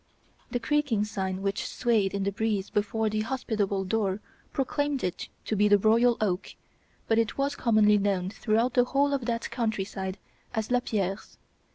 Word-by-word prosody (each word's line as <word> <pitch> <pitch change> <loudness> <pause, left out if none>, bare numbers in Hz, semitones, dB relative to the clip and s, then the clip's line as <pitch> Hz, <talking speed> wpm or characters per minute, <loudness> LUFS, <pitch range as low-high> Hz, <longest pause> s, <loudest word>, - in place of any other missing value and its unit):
The 245 - -1
creaking 270 -6 +1
sign 190 -2 -3
which 195 0 -1
swayed 220 -6 +1
in 200 - -1
the 200 - 0
breeze 205 -1 -1
before 220 +2 0
the 215 0 0
hospitable 215 -5 -1
door 195 0 0 0.3
proclaimed 285 0 -1
it 180 - -3 0.2
to 220 - -1
be 210 +1 +4
The 205 0 +6
Royal 230 +4 +4
Oak, 195 -4 -1 0.5
but 225 0 +3
it 225 -1 0
was 280 +1 0
commonly 215 -4 +4
known 195 -2 0
throughout 225 +3 +1
the 245 - +5
whole 280 +2 +2
of 265 -4 -1
that 230 -1 -2
country 220 -5 -1
side 190 -1 -5 0.4
as 220 +1 -2
Lapierre's. 210 -5 -1
215 Hz, 170 wpm, -28 LUFS, 200-240 Hz, 0.5 s, The